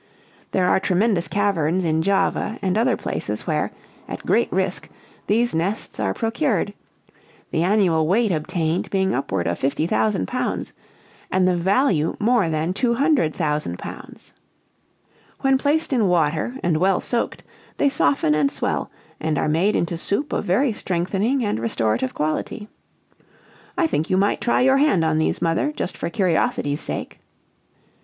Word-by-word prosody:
"There 185 -1 +1
are - - +4
tremendous 190 -1 +1
caverns 185 -4 +1
in 160 0 +1
Java 195 +4 0
and 190 -1 +1
other 235 +4 +2
places - - -4
where, - - -1 0.4
at - - -7
great - - +2
risk, - - -1 0.4
these 235 +3 +2
nests 175 - -2
are 95 -3 0
procured; 225 - 0 0.8
the 160 - 0
annual 175 -4 +2
weight 215 +4 +2
obtained 165 +1 -1
being 190 -1 +1
upward 95 -10 -1
of 85 +1 -1
fifty 140 +3 0
thousand 110 - +1
pounds, - - -3 0.6
and 185 0 +2
the 180 - +2
value 185 - +2
more 220 -5 +2
than 160 +3 -1
£200,000. 185 - -1 1.1
"When 270 -1 +3
placed 295 +1 +1
in 230 -6 +3
water 165 - +1
and 170 -3 +2
well 185 +2 +2
soaked, 235 -1 -2 0.3
they 285 - +3
soften 150 - +2
and 150 -2 +2
swell, 145 - -2 0.3
and 155 -1 -1
are - - 0
made 170 +7 +2
into 170 0 -1
soup 205 - -2
of - - -1
very 220 +7 +2
strengthening 200 +8 -1
and 205 - -1
restorative 115 +2 -1
quality. 155 +7 -2 1.1
"I 345 - +3
think 160 - -1
you 185 - +2
might 200 +1 +1
try 240 - +2
your 265 +1 +4
hand 275 - +3
on 160 -1 +1
these, 160 - 0
mother, 165 - +1
just 195 -10 -4
for 170 - -3
curiosity's 165 -6 0
sake." - - -5
180 Hz, 150 wpm, -22 LUFS, 155-220 Hz, 1.1 s, are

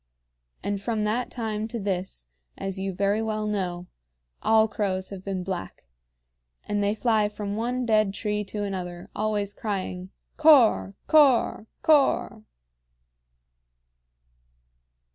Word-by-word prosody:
And 200 -1 -2
from 220 0 -1
that 225 +4 -1
time 220 -2 -3
to 230 +1 -5
this, 190 - -3 0.3
as 195 0 -4
you 195 0 -2
very 200 +3 +1
well 215 -1 -2
know, 180 -4 -2 0.6
all 220 0 +4
crows 190 -3 -2
have 190 -2 -8
been 190 -2 -3
black; 185 -1 -5 0.8
and 205 0 -1
they 205 +1 +1
fly 220 -2 +2
from 205 -1 -5
one 245 +3 -1
dead 215 -3 +3
tree 210 +1 -2
to 205 +1 -4
another, 180 -3 -5
always 210 -1 -1
crying, 190 -4 -4 0.3
"Cor 235 - +5
cor 270 -7 +4 0.2
cor!" 275 -6 +3
210 Hz, 120 wpm, -26 LUFS, 195-220 Hz, 0.8 s, Cor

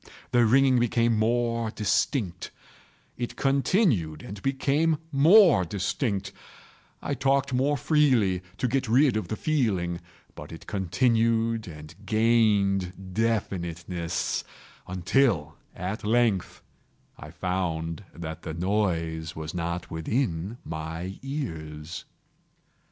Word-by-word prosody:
The 120 -2 +4
ringing 130 +1 +4
became 120 -1 +2
more 115 +1 +1
distinct:—it 110 - -3
continued 135 - +1
and 100 0 -8
became 145 +4 +1
more 160 - +6
distinct: 100 - -2 0.7
I - - -1
talked 135 0 +1
more 140 +3 +2
freely 125 - +2 0.2
to 125 - 0
get 135 +1 0
rid 130 +1 +4
of 110 - -2
the 110 - -3
feeling: 100 - 0 0.3
but - - -10
it 80 - -10
continued 115 +3 +1
and 75 -1 -10
gained 100 -5 +1
definiteness—until, 90 - -1 0.2
at 95 +4 -4
length, 110 -3 +1 0.6
I - - -9
found 85 -1 -3
that 80 -1 -7
the 80 -2 -6
noise 85 -4 -1
was 80 0 -6
not 85 0 -3
within 90 - -2
my 80 +4 -5
ears. 80 - -6
105 Hz, 100 wpm, -26 LUFS, 85-125 Hz, 0.7 s, more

